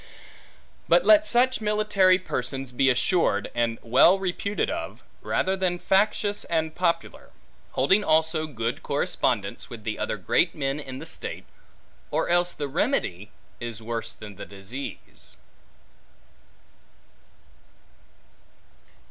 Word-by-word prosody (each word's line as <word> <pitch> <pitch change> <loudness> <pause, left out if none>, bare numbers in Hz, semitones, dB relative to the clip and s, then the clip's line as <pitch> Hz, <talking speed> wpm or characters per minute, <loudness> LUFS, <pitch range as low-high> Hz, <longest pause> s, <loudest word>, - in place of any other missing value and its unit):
But - - +5
let 315 0 +6
such 250 0 +3
military 210 -3 +3
persons 135 -6 -3
be 135 +2 +3
assured, 125 - +1
and 115 -1 0
well 130 +11 +5
reputed 195 +2 -2
of, - - -5 0.2
rather 190 +1 0
than 185 -2 0
factious 205 +2 +1
and 160 -1 -1
popular; 175 -1 -2 0.4
holding 200 +2 +3
also 160 -2 +2
good 115 -4 -3
correspondence 120 -7 -1
with 115 -3 -9
the 110 0 -4
other - - -2
great 165 - +1
men 140 -1 -2
in 130 -3 -7
the - - -8
state; - - -6 0.6
or - - -1
else 175 0 +3
the 145 - -4
remedy, 135 - -1 0.3
is 120 -2 -6
worse 115 0 -4
than 105 -3 -11
the - - -7
disease. 100 +8 -9
150 Hz, 115 wpm, -25 LUFS, 115-190 Hz, 0.6 s, let